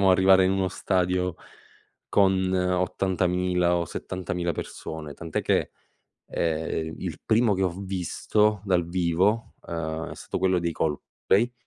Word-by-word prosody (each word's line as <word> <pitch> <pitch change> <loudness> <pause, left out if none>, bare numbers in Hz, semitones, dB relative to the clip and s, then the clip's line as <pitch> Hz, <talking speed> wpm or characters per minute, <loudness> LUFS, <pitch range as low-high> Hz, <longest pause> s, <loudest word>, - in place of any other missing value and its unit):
diciamo 95 -1 +5
arrivare 95 0 +6
in - - +2
uno 95 -1 +1
stadio 90 -1 0 0.7
con 95 -2 +3
80000 90 -1 +1
o 85 - 0
70000 90 0 -3
persone, 80 -1 -6
tant'è 80 -2 -3
che, - - +1 0.6
ehm, 80 0 -2
il 85 -4 -5
primo 110 -1 +3
che 95 - -1
ho - - +3
visto 100 +2 0
dal 90 -4 +1
vivo, 90 +5 +1
ehm, 80 -1 -3
è - - -7
stato - - -5
quello 95 0 +2
dei 85 -1 -1
Coldplay. 95 +9 0
90 Hz, 135 wpm, -26 LUFS, 85-95 Hz, 0.7 s, arrivare